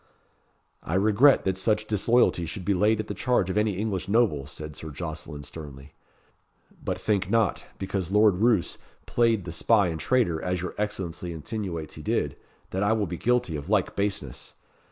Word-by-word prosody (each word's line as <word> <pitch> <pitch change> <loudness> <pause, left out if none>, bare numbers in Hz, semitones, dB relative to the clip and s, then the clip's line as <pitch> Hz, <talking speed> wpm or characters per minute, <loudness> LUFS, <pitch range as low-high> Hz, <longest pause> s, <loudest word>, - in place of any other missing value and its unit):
"I 80 - -3
regret 110 +8 +5
that 95 -1 0
such 105 +2 +1
disloyalty 105 -4 +2
should 90 +2 -6
be 100 - +2
laid 105 +4 +3
to 110 - -2
the 105 - -5
charge 100 -3 +1
of - - -4
any 105 -1 +2
English 100 -3 -2
noble," 100 - +2
said 75 +1 -8
Sir 80 - -7
Jocelyn 75 -1 -6
sternly. 70 -2 -10 0.9
"But - - -2
think 100 -3 0
not, 115 -1 +1
because 95 -2 -3
Lord 105 -1 +4
Roos 110 -3 +2 0.3
played 115 -5 +2
the 85 - -5
spy 100 +4 +3
and 80 -1 -4
traitor, 95 -8 +1
as 90 0 -1
your 90 +1 -4
Excellency 90 -4 -3
insinuates 85 -1 -5
he 75 - -9
did, - - -1 0.4
that 95 - -2
I 100 +2 +3
will 110 -2 +1
be 85 -1 -5
guilty 120 -7 +1
of 75 +4 -6
like 100 -4 +1
baseness. 95 -11 -3
95 Hz, 175 wpm, -26 LUFS, 80-110 Hz, 0.9 s, regret